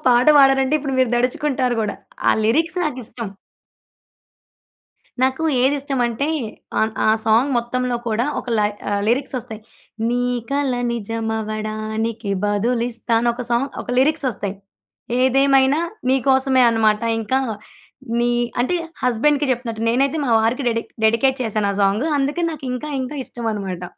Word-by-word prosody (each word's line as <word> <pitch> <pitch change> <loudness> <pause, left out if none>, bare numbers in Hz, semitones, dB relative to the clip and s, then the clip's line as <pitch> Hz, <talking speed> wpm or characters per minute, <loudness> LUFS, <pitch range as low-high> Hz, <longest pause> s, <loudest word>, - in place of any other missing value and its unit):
పాట 245 0 +4
పాడానంటే 270 +1 +4
ఇప్పుడు 275 -2 -4
మీరు 255 -3 +3
దడుచుకుంటారు 255 0 0
గూడా. 210 -2 -2 0.3
ఆ - - +7
లిరిక్స్ 325 +10 +1
నాకిష్టం. 245 -6 -5 1.9
నాకు 260 +4 +1 0.2
ఏదిష్టం 275 0 0
అంటే, 240 +5 -2 0.5
అన్ 220 0 +1
ఆ - - +5 0.2
సాంగ్ 225 +5 +3
మొత్తంలో 245 +1 -1
కూడా 230 +2 0
ఒక - - -11
లై 210 0 +2 0.2
ఆహ్, 200 0 0
లిరిక్స్ 260 +4 0
ఒస్తాయి. 225 -2 -9 0.5
నీ 245 +1 0 0.3
కల 280 -1 +1 0.2
నిజం 225 0 -3
అవ్వడానికి 215 0 -3 0.2
బదులిస్తా! 230 +3 -1
అని 235 +1 +1
ఒక 250 +1 -5
సాంగ్ 245 +4 +1
ఒక - - -14
లిరిక్స్ 305 +2 +2
ఒస్తాయి. 200 -1 -5 0.7
ఏదేమైనా 270 +2 +4 0.3
నీకోసమే 265 0 +3
అన్నమాట 220 -1 +2 0.2
ఇంకా 225 +4 0 0.8
నీ 240 0 +2 0.3
అంటే 255 +9 +1 0.3
హస్బెండ్‌కి 275 +4 +2
చెప్తునట్టు. 230 -3 -3
నేనైతే 275 +6 +1
మా 240 - 0
వారికి 235 +5 0
డెడిక్ 230 0 -3 0.2
డెడికేట్ 260 +5 +3
చేశాను 215 -2 0
ఆ - - -6
సాంగు. 200 +8 +2
అందుకే 285 +5 -1
నాకింకా 270 -1 -5
ఇంకా 260 +3 -5
ఇష్టం 240 -1 -6
అన్నమాట. 190 -4 -4
245 Hz, 135 wpm, -20 LUFS, 225-270 Hz, 1.9 s, ఆ